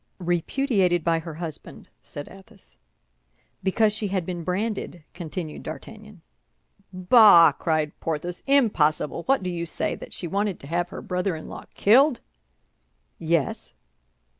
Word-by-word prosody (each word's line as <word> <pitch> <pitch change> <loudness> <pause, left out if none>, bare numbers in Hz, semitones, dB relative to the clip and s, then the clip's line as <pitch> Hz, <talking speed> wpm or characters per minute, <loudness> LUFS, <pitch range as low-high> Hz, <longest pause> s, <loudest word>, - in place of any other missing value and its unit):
"Repudiated 180 - 0
by 165 0 +1
her 165 -1 -8
husband," 160 -2 -8
said 145 - -8
Athos. 195 +1 -15 0.8
"Because 210 +2 +2
she 215 -1 -2
had 190 -3 -2
been 175 -1 -5
branded," 185 -2 -3
continued 170 -2 -6
D'Artagnan. 210 +2 -10 0.7
"Bah!" 185 -3 +7
cried 155 +1 -1
Porthos. 165 +2 -4
"Impossible! 175 - +2
What 270 -6 +2
do 180 - -2
you 170 -1 -4
say—that - - -3
she - - -6
wanted 200 +2 -2
to - - -11
have 175 +4 -2
her - - -8
brother 180 0 -2
in 155 - -9
law - - -9
killed?" 255 +5 +4 1.0
"Yes." 165 -3 -1
180 Hz, 130 wpm, -24 LUFS, 165-205 Hz, 1.0 s, Bah